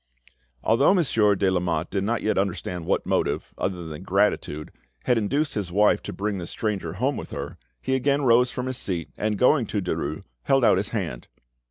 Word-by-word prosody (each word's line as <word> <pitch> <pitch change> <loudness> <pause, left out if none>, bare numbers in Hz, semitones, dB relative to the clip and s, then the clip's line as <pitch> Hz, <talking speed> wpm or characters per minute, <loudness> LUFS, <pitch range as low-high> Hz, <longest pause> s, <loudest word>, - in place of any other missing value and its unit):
Although 135 - +4
Monsieur 115 - +3
de 95 0 +1
Lamotte 85 -3 -1
did 100 -2 -1
not 115 +3 -1
yet 110 - +1
understand 90 -3 -2
what - - +1
motive, - - -1
other 90 -3 -3
than 75 -2 -7
gratitude, 75 +1 0 0.3
had 125 - +3
induced 140 +7 0
his 100 -4 -3
wife 105 +3 +3
to - - -6
bring 100 -1 -3
this 85 - -6
stranger 100 -7 -2
home 130 +9 -1
with - - -7
her, - - -6 0.2
he 130 - 0
again 140 +2 +1
rose 125 0 +5
from 125 +1 -4
his 130 -1 -2
seat, 85 -8 -3
and 105 -1 -1
going 125 0 +4
to 105 - -1
Derues, 80 -4 -3 0.2
held 135 - +3
out - - +5
his 100 +2 -1
hand. 85 - -4
105 Hz, 195 wpm, -25 LUFS, 90-125 Hz, 0.3 s, rose